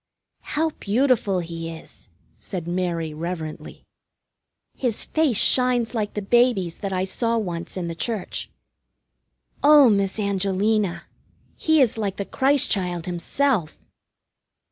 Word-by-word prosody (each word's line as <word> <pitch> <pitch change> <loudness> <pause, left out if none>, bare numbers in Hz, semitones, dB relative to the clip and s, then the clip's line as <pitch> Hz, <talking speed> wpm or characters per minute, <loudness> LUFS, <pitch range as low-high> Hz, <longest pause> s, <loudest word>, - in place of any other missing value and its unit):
"How 320 +1 +2
beautiful 210 -4 +1
he 165 -1 -6
is!" 160 -9 -12 0.3
said 175 -3 -6
Mary 175 -3 -2
reverently. 160 -1 -6 0.9
"His 245 -5 -1
face 310 -8 +1
shines 250 0 +3
like 215 -3 -2
the 210 - -3
Baby's 230 -6 +2
that 200 -2 -4
I 185 0 0
saw 230 +4 -1
once 175 -5 -4
in 175 -2 -3
the 165 - -4
Church. 210 +4 -4 1.1
Oh, 290 -4 +7
Miss 200 -1 0
Angelina! 200 0 0 0.5
He 315 -2 +3
is 230 -2 -1
like 200 -3 -2
the 200 - -3
Christ 275 +4 +2
Child 180 -4 -1
himself!" 180 - -1
200 Hz, 120 wpm, -23 LUFS, 175-240 Hz, 1.1 s, Oh